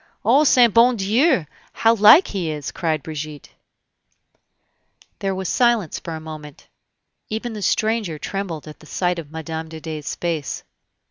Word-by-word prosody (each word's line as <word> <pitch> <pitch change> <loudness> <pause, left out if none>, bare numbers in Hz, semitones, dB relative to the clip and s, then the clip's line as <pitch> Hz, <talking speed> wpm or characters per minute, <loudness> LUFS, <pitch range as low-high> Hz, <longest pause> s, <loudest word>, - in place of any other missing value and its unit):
"O 265 +7 +5
saint 245 -6 +5
bon 240 +2 +5
Dieu! 225 - +2 0.3
how 225 0 +3
like 230 - +7
he 185 -5 -3
is!" 150 -3 -4
cried 160 -5 -2
Brigitte. 155 -2 -7 1.7
There 195 -1 -2
was 190 -1 -4
silence 235 - +1
for 165 - -6
a - - -6
moment; 155 -2 -10 0.6
even 225 +2 -4
the 210 - -6
stranger 215 -3 0
trembled 175 -3 -5
at 155 - -11
the 155 - -16
sight 180 +1 -1
of 155 -3 -9
Mme. 160 0 -5
de 160 0 -8
Dey's 155 -2 -5
face. 165 -6 -3
175 Hz, 150 wpm, -21 LUFS, 155-220 Hz, 1.7 s, like